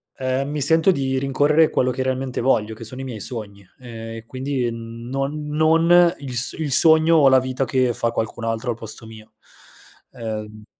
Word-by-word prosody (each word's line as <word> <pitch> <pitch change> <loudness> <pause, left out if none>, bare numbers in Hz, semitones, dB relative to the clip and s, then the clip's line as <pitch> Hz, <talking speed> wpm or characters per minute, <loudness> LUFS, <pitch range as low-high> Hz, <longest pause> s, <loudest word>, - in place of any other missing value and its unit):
Ehm, 130 +2 -2
mi 150 -1 -3
sento 160 +5 +4
di 135 -5 -1
rincorrere 145 +4 +2
quello 130 0 +1
che 130 - -4
realmente 130 0 -2
voglio 110 -4 +1
che 115 - -10
sono 125 +4 -7
i - - -6
miei 125 -5 -6
sogni, 100 -3 -6 0.2
ehm, 115 -2 -8
e 115 - -10
quindi 130 0 -3
non 125 +6 -5
non 165 +3 +4
il 135 -3 -7
s 120 +1 0
il 155 -3 -4
sogno 160 +3 +5
o 140 -3 +6
la 130 0 +5
vita 130 +1 -2
che 130 -2 +1
fa 115 - -1
qualcun 115 0 -4
altro 115 +2 -2
al - - -4
posto 110 0 -4
mio. 110 0 -14 0.8
Ehm 110 -2 -7
130 Hz, 190 wpm, -21 LUFS, 115-145 Hz, 0.8 s, o